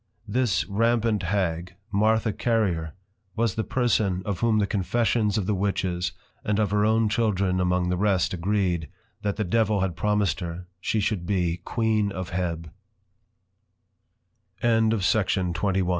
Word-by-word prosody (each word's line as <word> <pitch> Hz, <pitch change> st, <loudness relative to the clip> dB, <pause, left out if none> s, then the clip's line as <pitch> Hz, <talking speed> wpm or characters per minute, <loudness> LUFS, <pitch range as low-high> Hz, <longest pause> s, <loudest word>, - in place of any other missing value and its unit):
_ -, -, -44 dB, 0.2 s
This 120 Hz, 0 st, +1 dB
Rampant 115 Hz, 0 st, +1 dB
Hag, 90 Hz, -2 st, -1 dB, 0.2 s
Martha 110 Hz, +2 st, +2 dB
Carrier, 95 Hz, -11 st, 0 dB, 0.4 s
was 115 Hz, -3 st, +1 dB
the 110 Hz, -, -2 dB
person, 105 Hz, -8 st, +1 dB
of 100 Hz, -4 st, -2 dB
whom 115 Hz, -2 st, +2 dB
the 105 Hz, -, +3 dB
Confessions 105 Hz, +1 st, +1 dB
of 100 Hz, -, 0 dB
the 105 Hz, -, 0 dB
Witches, 95 Hz, -2 st, -1 dB, 0.3 s
and 105 Hz, -1 st, 0 dB
of 105 Hz, -3 st, +1 dB
her 105 Hz, 0 st, +2 dB
own 110 Hz, +1 st, +3 dB
Children 100 Hz, -4 st, +1 dB
among 90 Hz, 0 st, +1 dB
the 90 Hz, -, 0 dB
rest, 95 Hz, -3 st, +1 dB
agreed, 90 Hz, -3 st, 0 dB, 0.3 s
That 100 Hz, -1 st, -1 dB
the 105 Hz, -, -1 dB
Devil 110 Hz, 0 st, +1 dB
had 95 Hz, -3 st, -1 dB
promised 105 Hz, -4 st, +1 dB
her, 85 Hz, 0 st, -6 dB
she 110 Hz, -, 0 dB
should 95 Hz, -4 st, -1 dB
be 90 Hz, -3 st, 0 dB
_Queen 110 Hz, -3 st, +1 dB
of 95 Hz, -2 st, -5 dB
100 Hz, 135 wpm, -25 LUFS, 90-110 Hz, 0.4 s, the